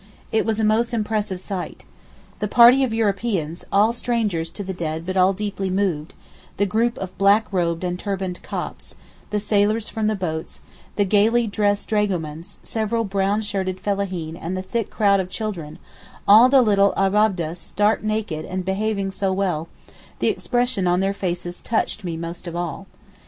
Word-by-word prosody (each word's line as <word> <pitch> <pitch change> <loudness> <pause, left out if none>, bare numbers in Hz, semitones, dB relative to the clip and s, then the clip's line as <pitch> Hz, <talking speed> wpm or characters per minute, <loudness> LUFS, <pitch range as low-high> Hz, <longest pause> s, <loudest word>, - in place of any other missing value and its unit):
It 220 - +1
was 220 -1 0
a - - +1
most 230 +3 +2
impressive 210 -3 -1
sight. 185 -1 -6 0.5
The 210 - -1
party 245 +5 +7
of 255 - 0
Europeans, 200 -6 -1
all 210 +3 +4
strangers 215 -9 -1
to 205 - -5
the 190 0 -4
dead 160 -2 -4
but 185 +1 -3
all 185 0 +5
deeply 200 -1 -3
moved; 185 -5 -1 0.4
the 205 - +2
group 230 +4 +1
of 185 -1 -6
black 205 +2 +4
robed 170 -2 0
and 180 0 -2
turbaned 190 -3 -3
Copts; - - -6 0.3
the 210 - 0
sailors 210 +1 +1
from 220 -1 -1
the 215 - +1
boats; 160 -5 -4 0.3
the 205 - +2
gaily 220 +4 +3
dressed 205 -1 0
dragomans; 180 -4 -2
several 230 +1 -1
brown 200 +1 0
shirted 190 -3 -2
fellaheen 185 -6 -2
and 175 +2 -4
the 185 - -3
thick 225 +3 -2
crowd 200 -2 +3
of 185 -1 -2
children—all 200 +4 +1
the 265 -1 +6
little 200 -2 +3
Abab'deh 195 -4 +2
stark 205 +4 0
naked 215 -7 -2
and 185 +3 -3
all 190 +1 -1
behaving 200 -1 -1
so 190 0 -1
well, 180 -5 -1 0.5
the - - +2
expression 245 -6 0
on 175 +1 +2
their 195 0 +1
little 200 - -10
faces 175 -1 -3
touched 220 -1 -1
me 170 -3 -3
most 170 +2 -6
of 170 - -5
all. 175 +2 -4
200 Hz, 175 wpm, -22 LUFS, 180-215 Hz, 0.5 s, party